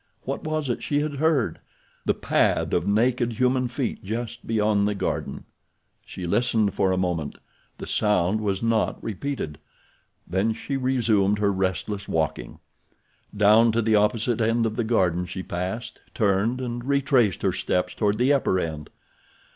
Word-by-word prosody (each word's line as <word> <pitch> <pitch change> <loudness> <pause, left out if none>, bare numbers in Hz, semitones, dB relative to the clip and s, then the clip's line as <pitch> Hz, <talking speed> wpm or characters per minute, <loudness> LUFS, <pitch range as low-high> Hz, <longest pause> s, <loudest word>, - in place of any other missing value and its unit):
What - - -4
was 155 -2 -2
it - - -4
she 145 0 0
had 150 -1 -3
heard? 155 -4 +1 0.5
The - - +2
pad - - +1
of 85 +2 +1
naked 120 +3 +2
human 125 +1 +1
feet 120 0 -3
just 115 +3 -5
beyond 105 -2 +2
the 105 - -1
garden. - - -3 0.6
She 90 - -7
listened 110 +1 +1
for 95 -2 +1
a 95 - +1
moment. 85 -5 -2 0.4
The - - -7
sound 105 0 +1
was 100 -1 -1
not 115 -1 +1
repeated. 110 - -4 0.7
Then 95 +5 0
she 135 +5 -5
resumed 115 -6 +2
her 100 -1 +1
restless 95 +2 -2
walking. 80 -2 -2 0.8
Down 110 +3 +6
to 115 - +2
the 110 0 +3
opposite 110 +3 +1
end 115 +1 +2
of 110 -1 -2
the 120 - 0
garden 90 -6 +1
she 95 +1 -6
passed, 95 +8 -5
turned 110 +4 +1
and 120 -1 -4
retraced 135 - +2
her - - +2
steps 90 0 -1
toward 105 -1 0
the 130 +5 +3
upper 110 -9 +1
end. 80 -3 -4
110 Hz, 155 wpm, -24 LUFS, 95-120 Hz, 0.8 s, Down